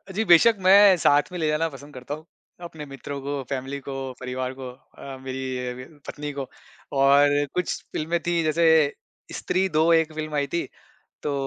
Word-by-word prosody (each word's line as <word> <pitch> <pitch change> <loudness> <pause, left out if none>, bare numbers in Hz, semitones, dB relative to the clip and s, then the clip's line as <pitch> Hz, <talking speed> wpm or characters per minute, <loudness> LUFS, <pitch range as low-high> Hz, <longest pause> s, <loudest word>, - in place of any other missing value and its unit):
जी, 220 - +1
बेशक़ 200 +5 +6
मैं 195 +1 +7
साथ 145 0 +3
में 180 - -5
ले 160 - 0
जाना 155 +2 +1
पसंद 145 0 -13
करता 130 +2 -7
हूँ 155 +1 -14 0.4
अपने 160 -3 -8
मित्रों 140 +1 -7
को, 140 0 -3
फ़ैमिली 135 +1 -4
को, 135 - -4 0.2
परिवार 130 0 -4
को 130 - -6 0.3
अ, 135 -1 -8
मेरी 130 -1 -4
अ, 150 +2 -17
पत्नी 150 0 -5
को 140 -2 -5 0.5
और 140 +1 +5 0.3
कुछ 180 -2 0 0.2
फ़िल्में 165 +3 -1
थी, 170 -1 +1
जैसे 160 -1 +3 0.4
स्त्री 190 +1 0
2 155 -2 +2
एक 160 -1 +2
फ़िल्म 155 -1 -5
आई 140 -1 0
थी, 170 +4 -2 0.6
तो 145 - -2
145 Hz, 180 wpm, -24 LUFS, 135-165 Hz, 0.6 s, मैं